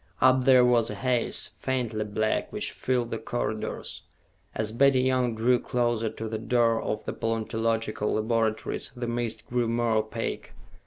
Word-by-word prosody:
Up 130 0 +4
there 130 -2 +7
was 120 -2 +3
a - - -4
haze, 125 -2 0
faintly 120 -5 -1
black, 110 +1 -1
which - - -2
filled 125 -2 -1
the 115 - -2
corridors. 110 -2 -4 0.5
As 110 0 -2
Betty 130 +2 +4
Young 125 -2 +1
drew 120 +2 +3
closer 120 -3 0
to 110 - -6
the 110 0 -3
door 115 0 +2
of 105 - -3
the - - -4
paleontological 115 -1 -1
laboratories, 110 0 -1
the 120 0 -4
mist 120 -1 -2
grew 120 -1 0
more 115 -1 +1
opaque. 110 +1 -3
115 Hz, 155 wpm, -27 LUFS, 110-125 Hz, 0.5 s, there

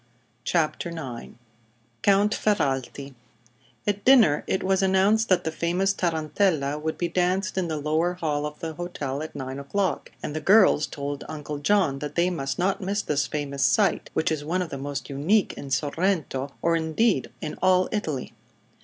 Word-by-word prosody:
CHAPTER 165 +3 0
IX 135 -8 -7 0.7
COUNT 200 +1 +4
FERRALTI 140 - -1 0.7
At 205 0 -1
dinner 230 - +5
it 190 - 0
was 190 0 +2
announced 195 +4 +3
that 180 -2 +3
the 160 - -2
famous 180 +4 0
Tarantella 160 -4 0
would 160 +1 -3
be 175 - 0
danced 185 +4 0
in 185 -2 0
the 160 -1 -2
lower 155 +4 0
hall 150 -4 -1
of 150 0 -9
the 160 -1 -4
hotel 150 -5 -4
at 155 - -7
nine 130 +1 -5
o'clock, 185 +6 -2
and 150 - -4
the 155 - -2
girls 190 -3 +5
told 145 0 -5
Uncle 150 -1 -5
John 155 -4 +2
that 150 +1 -6
they 175 +2 +2
must 135 -5 -3
not 195 +4 0
miss 200 +2 -1
this 145 -1 0
famous 140 -2 -2
sight, - - +2
which 160 - +1
is 155 -2 -2
one 180 +5 0
of 170 - -7
the 140 - -6
most 140 -1 -4
unique 160 +10 +1
in 140 - -8
Sorrento, 145 -1 -1
or 170 0 +3
indeed 165 +7 +1
in 155 - -5
all 185 0 +4
Italy. 155 - -3
160 Hz, 170 wpm, -25 LUFS, 145-190 Hz, 0.7 s, dinner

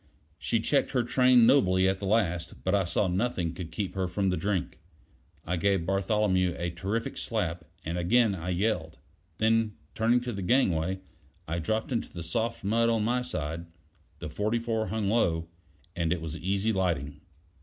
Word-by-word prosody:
She 115 - 0
checked 140 +6 +1
her 125 -2 +2
train 125 0 +5
nobly 95 -9 +4
at 95 0 0
the 100 - -3
last, 90 -5 0
but 95 - +1
I 100 -2 +3
saw 90 +3 +1
nothing 90 -3 -1
could 85 -2 -7
keep 95 +3 -3
her 95 -1 -1
from 95 +1 0
the - - +1
drink. 95 -4 -2 0.7
I 90 +1 -1
gave 95 -1 +1
Bartholomew 95 -2 +1
a 85 0 -2
terrific 105 +6 -3
slap, 90 -7 -2 0.2
and 85 +2 -2
again 110 +5 +3
I 90 -1 -5
yelled; 90 -4 -1 0.4
then 110 -1 +2 0.2
turning 115 +2 +3
to 125 -1 -4
the 100 - -4
gangway, 95 -5 +1 0.5
I 85 +2 -2
dropped 110 - -1
into 120 - -2
the 85 - -6
soft 115 +5 -2
mud 115 +4 +2
on 115 -2 +1
my 125 +3 +1
side: 85 -8 -4 0.5
the - - -6
44 110 +5 -1
hung 105 +1 -1
low, 85 -7 +1 0.5
and 85 -2 0
it 90 - +1
was 80 -1 -5
easy 100 +5 0
lighting. 75 -7 -1
95 Hz, 175 wpm, -28 LUFS, 85-115 Hz, 0.7 s, train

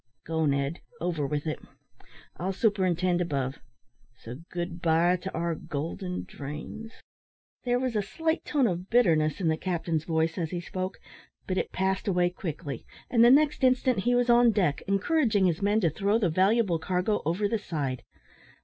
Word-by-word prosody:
"Go, 160 -1 0
Ned, 140 +3 0 0.2
over 165 -5 -1
with 145 +1 -2
it. 155 - -3 0.8
I'll 190 +2 -2
superintend 185 -4 +1
above; 135 -6 -2 0.6
so 120 +2 -9
good 175 0 -5
bye 170 +2 +3
to 190 +2 -6
our 170 +1 -1
golden 165 +5 -4
dreams." 150 - -8 0.7
There 245 0 +2
was 255 -2 -2
a 210 - +2
slight 320 - -2
tone 285 -4 +1
of 180 -2 -2
bitterness 160 - +3
in 180 - 0
the 160 0 +2
captain's 165 -3 -2
voice 160 +1 0
as 165 -2 -2
he 175 - -3
spoke, 185 +2 -4 0.5
but 185 0 -1
it - - -3
passed 190 +1 -1
away 180 -2 +2
quickly, 155 - -6 0.3
and 230 -2 +5
the 240 - +8
next 295 +2 +4
instant 255 -3 +3
he 245 +5 +2
was 245 0 +2
on 240 0 +6
deck 185 -10 +1
encouraging 205 - +2
his 175 -1 +1
men 205 +2 +2
to 165 -5 +2
throw 200 +5 +1
the 205 -6 +1
valuable 190 +1 +2
cargo 185 +5 0
over 175 +7 0
the 225 +1 -1
side. 140 - -3
180 Hz, 170 wpm, -28 LUFS, 160-215 Hz, 0.8 s, the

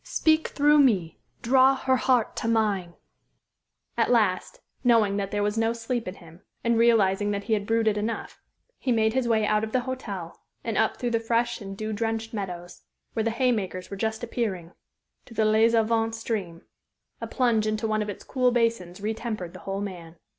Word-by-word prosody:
Speak 315 0 +2
through 295 +1 +4
me! 195 - +2 0.2
Draw 265 +2 +5
her 260 0 +1
heart 250 -3 +1
to - - -2
mine_." 205 -6 0 1.0
At - - +1
last, 215 -7 +1 0.2
knowing 225 -5 +3
that 200 -1 -2
there 205 0 -1
was 210 +2 0
no 225 0 +2
sleep 235 0 -3
in 185 - -5
him, 170 0 -16 0.2
and 235 0 +2
realizing 205 -4 +3
that 200 -1 -2
he 225 - -1
had 205 -1 -1
brooded 225 -2 +2
enough, 220 +2 -4 0.4
he 260 - -1
made 220 -1 +2
his 260 -1 0
way 220 -2 +2
out 210 0 +1
of 220 - -4
the 255 - +2
hotel 205 -9 -6 0.2
and - - -3
up - - +1
through 240 -1 -2
the 230 - +2
fresh 235 +1 0
and 195 -1 -7
dew 215 +1 -3
drenched 225 +1 -2
meadows, 180 -4 -6 0.3
where 220 - 0
the 230 - +1
haymakers 220 -7 -1
were - - -4
just 220 +3 -2
appearing, 200 -8 -3 0.6
to 230 - -13
the 220 - +2
Les 220 +2 +4
Avants 225 0 +1
stream. 200 -7 -4 0.6
A - - -4
plunge 235 -4 +1
into 215 +1 -1
one 215 0 0
of 210 - -3
its 205 - -7
cool 255 -1 +1
basins 230 -7 0
retempered 215 -4 -4
the - - -10
whole 195 +1 -2
man. 175 -5 -7
220 Hz, 190 wpm, -26 LUFS, 200-235 Hz, 1.0 s, Draw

